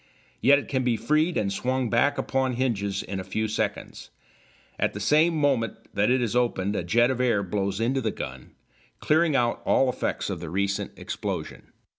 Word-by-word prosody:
Yet 140 Hz, +2 st, +6 dB
it 145 Hz, -, -5 dB
can 130 Hz, -2 st, -1 dB
be 120 Hz, -2 st, +1 dB
freed 155 Hz, +9 st, +1 dB
and 100 Hz, -2 st, 0 dB
swung 130 Hz, +3 st, -1 dB
back 120 Hz, +5 st, +2 dB
upon 130 Hz, -1 st, 0 dB
hinges 100 Hz, -6 st, -1 dB
in 95 Hz, 0 st, -5 dB
a -, -, -4 dB
few 110 Hz, +4 st, -2 dB
seconds. 110 Hz, -, -4 dB, 0.7 s
At -, -, +1 dB
the -, -, -6 dB
same 160 Hz, +3 st, +3 dB
moment 135 Hz, -7 st, +1 dB, 0.2 s
that 105 Hz, +2 st, +2 dB
it 125 Hz, 0 st, +2 dB
is 120 Hz, 0 st, -2 dB
opened 105 Hz, -5 st, 0 dB
a -, -, -1 dB
jet 120 Hz, +8 st, +3 dB
of 125 Hz, -1 st, -2 dB
air 115 Hz, -5 st, +2 dB
blows 100 Hz, +1 st, -2 dB
into 130 Hz, +4 st, +1 dB
the 115 Hz, -, 0 dB
gun, 65 Hz, -9 st, -8 dB, 0.4 s
clearing 155 Hz, -1 st, +2 dB
out 120 Hz, -2 st, +1 dB
all 135 Hz, -, +3 dB
effects 125 Hz, -4 st, -2 dB
of 90 Hz, -, -4 dB
the 85 Hz, -1 st, -6 dB
recent 100 Hz, +3 st, -1 dB
explosion. -, -, -5 dB
120 Hz, 190 wpm, -26 LUFS, 100-130 Hz, 0.7 s, Yet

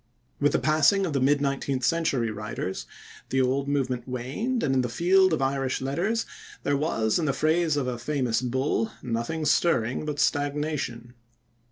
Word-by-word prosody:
With 145 Hz, 0 st, +2 dB
the -, -, +4 dB
passing 155 Hz, +6 st, +3 dB
of 165 Hz, -, -3 dB
the 140 Hz, -, +1 dB
mid 140 Hz, +2 st, +3 dB
nineteenth 135 Hz, -1 st, -1 dB
century 135 Hz, -8 st, +1 dB
writers, 105 Hz, -3 st, -5 dB, 0.4 s
the 135 Hz, -, +1 dB
old 135 Hz, +2 st, +1 dB
movement 130 Hz, -4 st, -1 dB
waned, 135 Hz, -, -2 dB
and 135 Hz, -, +1 dB
in 130 Hz, -, +3 dB
the 125 Hz, -, -2 dB
field 185 Hz, +7 st, +4 dB
of 155 Hz, -4 st, +1 dB
Irish 135 Hz, -1 st, 0 dB
letters 180 Hz, +13 st, -1 dB, 0.4 s
there 145 Hz, -, +1 dB
was, 135 Hz, -5 st, 0 dB
in 165 Hz, -, 0 dB
the 140 Hz, -, +1 dB
phrase 155 Hz, 0 st, +1 dB
of 140 Hz, -, 0 dB
a 125 Hz, -2 st, -3 dB
famous 125 Hz, -3 st, 0 dB
bull, 125 Hz, -3 st, 0 dB
nothing 120 Hz, +8 st, -2 dB
stirring 130 Hz, -6 st, +2 dB
but 150 Hz, -1 st, -3 dB
stagnation. 145 Hz, -5 st, -1 dB
140 Hz, 170 wpm, -26 LUFS, 125-155 Hz, 0.4 s, the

